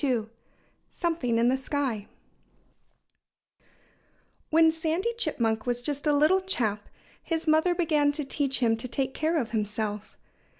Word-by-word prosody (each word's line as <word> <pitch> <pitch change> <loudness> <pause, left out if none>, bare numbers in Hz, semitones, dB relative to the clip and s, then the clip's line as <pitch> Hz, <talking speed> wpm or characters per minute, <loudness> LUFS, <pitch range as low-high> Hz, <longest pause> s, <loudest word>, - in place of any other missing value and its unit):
II 245 -6 +1 0.7
SOMETHING 325 -10 0
IN 235 +1 +3
THE 260 - +2
SKY 265 -6 -2 2.4
When 320 0 +5
Sandy 325 +8 -1
Chipmunk 230 - -1
was 245 0 -1
just 290 +1 -3
a - - +5
little 315 +6 +4
chap 215 - -2 0.3
his 325 -1 -3
mother 315 +3 +3
began 305 -4 +2
to 300 0 -3
teach 275 -1 -1
him 225 -2 +3
to 235 - -6
take 265 +1 -2
care 320 +2 0
of 235 -7 -2
himself. 210 -1 -3
285 Hz, 135 wpm, -27 LUFS, 230-320 Hz, 2.4 s, When